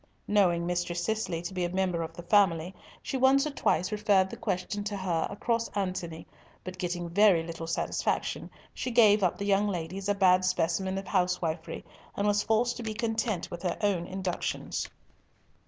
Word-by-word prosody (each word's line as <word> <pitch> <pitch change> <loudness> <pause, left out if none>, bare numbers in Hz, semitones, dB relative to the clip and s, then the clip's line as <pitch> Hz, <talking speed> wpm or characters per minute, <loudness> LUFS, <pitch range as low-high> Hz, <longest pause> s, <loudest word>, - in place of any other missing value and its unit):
Knowing 180 -5 +3
Mistress 175 0 -1
Cicely 215 -6 -2
to 175 +2 -5
be 180 -1 -1
a 175 - 0
member 185 -2 0
of 165 - -6
the 175 - -8
family, 175 -2 +3 0.3
she 270 - -2
once 265 +2 +4
or 300 - -2
twice 185 -7 0
referred 205 -3 +2
the - - -5
question 205 -2 -3
to 205 -1 -3
her 175 -4 -1
across 230 +2 -1
Antony, 180 -4 -3 0.4
but 185 0 -8
getting 175 -1 -2
very 180 -1 +4
little 165 0 -6
satisfaction, 165 - -1 0.2
she - - -3
gave 215 -3 +5
up 180 -3 +1
the 200 - -3
young 200 +1 +3
lady 180 -1 -3
as 195 +1 -4
a 205 - +2
bad 185 -2 +4
specimen 185 +1 0
of 195 - -4
housewifery, 180 -3 -1 0.3
and 200 - 0
was 205 0 +3
forced 235 +3 +1
to - - -6
be 220 -2 -4
content 225 -4 -1
with 175 - -6
her 180 - -1
own 190 -5 +1
inductions. 190 -1 -3
190 Hz, 185 wpm, -29 LUFS, 175-210 Hz, 0.4 s, gave